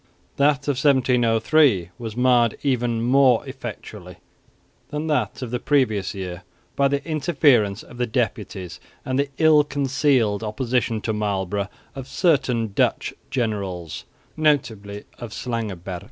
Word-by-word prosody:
That 140 -1 +2
of 140 -2 0
1703 125 - +3
was 115 -1 -6
marred 125 -2 +3
even 120 -4 0
more 130 -1 +4
effectually 105 -8 -8 0.7
than 150 +1 -3
that 130 -6 -1
of 120 - -6
the 125 - -1
previous 110 -10 +1
year 90 -2 -6 0.3
by 140 - +3
the 140 +2 -2
interference 140 - +2
of 120 - -14
the 125 0 -1
deputies, 105 -6 -3 0.3
and 130 +1 -1
the 140 0 0
ill 155 -2 +5
concealed 135 -6 +1
opposition 115 0 -1
to 110 - -2
Marlborough 100 -2 -2 0.2
of 135 -1 -8
certain 130 - +1
Dutch - - +1 0.2
generals, 100 - -3 0.3
notably 110 -10 0 0.2
of 115 -3 -7
Slangenburg. 100 -7 -4
120 Hz, 125 wpm, -23 LUFS, 105-140 Hz, 0.7 s, ill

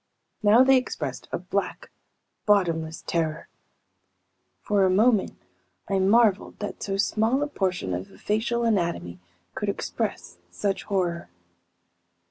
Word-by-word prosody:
Now 215 +4 +6
they 265 0 +6
expressed 255 - -4
a - - -1
black, - - -4 0.6
bottomless 165 -6 +1
terror. 165 -1 -2 1.2
For 205 -2 +2
a 190 - +4
moment 210 +2 +2 0.5
I 195 -1 +1
marveled 205 +1 +3
that 205 - -6
so 195 -1 -2
small 225 +6 +1
a - - -1
portion 185 - -2
of 90 +2 -4
a - - -17
facial 225 +3 -1
anatomy 170 - -1 0.3
could - - -3
express 85 0 -4
such 195 - -2
horror. 180 - -1
195 Hz, 120 wpm, -25 LUFS, 170-220 Hz, 1.2 s, Now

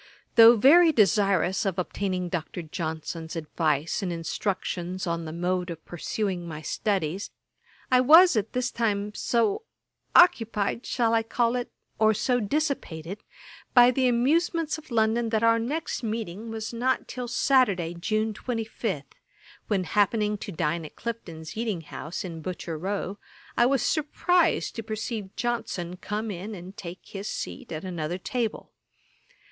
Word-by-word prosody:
Though 230 +1 +9
very 320 +9 +7
desirous 195 - +3
of 195 -3 -1
obtaining 185 0 -2
Dr. 175 0 -4
Johnson's 160 0 -5
advice 155 -1 -1
and 185 -3 -2
instructions 180 +2 -3
on 170 -1 -2
the 155 - -5
mode 180 +2 -1
of 165 -2 -8
pursuing 180 0 -3
my 155 -1 -7
studies, 190 +1 -1 0.6
I 255 0 +6
was 325 +5 +8
at 215 0 -1
this 250 0 -1
time 210 -3 -1
so 230 - +1 0.5
occupied, 230 - +4
shall 230 -3 +1
I 225 - +4
call 235 +1 0
it? 245 -1 -3 0.3
or 220 0 +4
so 245 +3 +1
dissipated, 210 - -2 0.6
by 245 0 +8
the 255 0 +2
amusements 315 +6 +1
of 315 - -17
London, 225 0 +2
that 220 0 0
our 230 0 +5
next 295 +8 -3
meeting 220 -2 -4
was 225 +1 -5
not 250 +3 0
till 250 -1 -5
Saturday, 230 -10 +2
June 215 +5 -1
25, 220 - -3 0.6
when 200 -3 +1
happening 210 +2 +1
to 200 - -6
dine 165 0 -1
at 155 - -10
Clifton's 170 -9 -6
eating 215 -6 -2
house, 155 +2 -6
in 165 -3 -6
Butcher 170 -1 -5
row, 195 +4 -3 0.4
I 240 - +5
was 270 -1 +2
surprized 330 +3 +1
to - - -2
perceive 215 -2 -5
Johnson 200 -7 -2
come 210 +4 -4
in 200 +4 -6
and 185 +2 -10
take 175 -1 -8
his 200 +1 -7
seat 265 - -5
at 155 -1 -5
another 175 -1 -3
table. 225 +3 -3
210 Hz, 145 wpm, -26 LUFS, 175-235 Hz, 0.6 s, Though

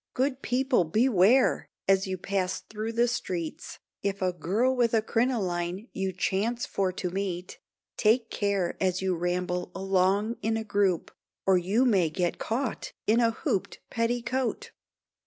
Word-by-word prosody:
Good 265 +1 0
people, 255 -4 +2
beware! 220 +6 +3 0.2
as 195 0 +3
you 190 0 -2
pass 185 0 -2
through 220 +2 -5
the 235 +1 +3
streets, 180 -8 -4 0.2
If 200 0 -2
a 185 -1 0
girl 205 +10 +1
with 235 -2 +2
a 220 - +4
crinoline 200 -5 -1
you 190 0 -1
chance 205 +6 -1
for 190 -2 -1
to 180 -1 -3
meet, 185 -2 -4 0.4
Take 225 +1 +2
care 200 -4 0
as 185 -1 +1
you 190 -1 +1
ramble 180 +1 -2
along 195 +4 +1
in 225 +1 0
a 220 - -3
group, 200 -5 +1 0.3
Or, 190 - +5
you 195 +8 +2
may 190 -9 +3
get 175 +2 -1
caught 240 +2 -3
in 220 +3 +3
a 230 -1 +4
hooped 200 -3 -2
petticoat. 240 +2 -1
200 Hz, 150 wpm, -28 LUFS, 185-230 Hz, 0.4 s, Or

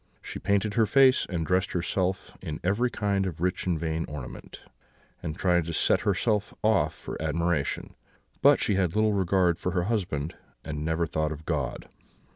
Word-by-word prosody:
She - - -6
painted 100 +1 +1
her 110 -1 +3
face, 130 +3 +5
and 85 -4 -2
dressed 95 +2 +1
herself 95 +2 -1
in 75 -1 -5
every 105 +7 +2
kind 100 -4 0
of 80 -4 -6
rich 90 +2 -1
and 85 -3 +1
vain 80 0 -1
ornament, 75 -5 -8 0.6
and 75 -3 -5
tried 90 -3 +2
to 85 - -4
set - - +2
herself 105 +1 0
off 110 -1 +2
for - - -7
admiration; 85 -4 -1 0.5
but - - +6
she - - +2
had 95 -3 +1
little 110 0 +3
regard 90 -3 +2
for 90 - -2
her 90 -2 +1
husband, 85 -8 -2 0.3
and 75 0 -4
never 80 +1 0
thought 80 -1 -1
of 80 0 -7
God. 70 -7 -2
90 Hz, 175 wpm, -27 LUFS, 80-100 Hz, 0.6 s, but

